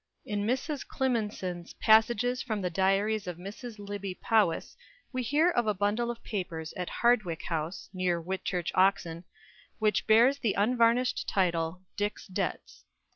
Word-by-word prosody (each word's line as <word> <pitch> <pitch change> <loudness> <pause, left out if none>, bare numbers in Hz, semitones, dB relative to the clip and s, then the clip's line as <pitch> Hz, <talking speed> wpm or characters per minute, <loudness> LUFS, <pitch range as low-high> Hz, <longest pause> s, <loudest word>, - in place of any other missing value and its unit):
In 205 -3 -2
Mrs. 265 +4 -1
Climenson's 210 -9 -2
"Passages 235 +3 +3
from 215 -4 -2
the 180 - -1
Diaries 195 +3 +1
of 175 -2 -4
Mrs. 215 +5 -8
Lybbe 200 -2 -6
Powys," 210 -7 +1 0.4
we 255 - -1
hear 295 +8 +3
of 240 -8 +1
a 210 - +2
bundle 205 +5 0
of 240 -1 -6
papers 165 -6 -4
at 180 -1 -4
Hardwick 215 -9 +1
House, 165 +1 -3
near 180 -2 0
Whitchurch, 180 0 -3
Oxon, 185 -3 +2 0.5
which 215 -2 +1
bears 240 +6 +5
the 225 -7 +1
unvarnished 235 +3 +2
title 175 -1 0
"Dick's 205 0 -2
Debts." 185 - -4
205 Hz, 140 wpm, -29 LUFS, 180-235 Hz, 0.5 s, bears